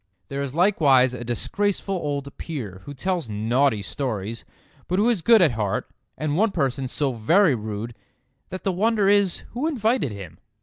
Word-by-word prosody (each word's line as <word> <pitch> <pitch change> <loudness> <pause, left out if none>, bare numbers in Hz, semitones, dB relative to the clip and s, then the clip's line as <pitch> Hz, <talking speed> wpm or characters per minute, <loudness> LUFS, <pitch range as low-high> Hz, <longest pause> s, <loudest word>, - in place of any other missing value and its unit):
There 140 0 -3
is 140 0 -4
likewise 145 -9 +4
a 125 - -6
disgraceful 195 - -1
old 145 -5 -3
Peer 110 - -6
who 145 - -7
tells 175 -2 -2
naughty 110 +2 +1
stories, 115 -2 -4 0.4
but 180 - 0
who 210 +4 +3
is 210 -7 -1
good 225 +1 +6
at 155 - +4
heart; 105 -4 -2 0.3
and 150 -1 -1
one 220 +6 +3
person 135 -6 -1
so 140 +2 -1
very 160 - +3
rude 110 0 -5 0.5
that 185 - -7
the 195 - +1
wonder 210 +2 +2
is 200 -3 +3
who 255 +6 -2
invited 235 - 0
him. 95 -5 -9
140 Hz, 170 wpm, -24 LUFS, 120-195 Hz, 0.5 s, good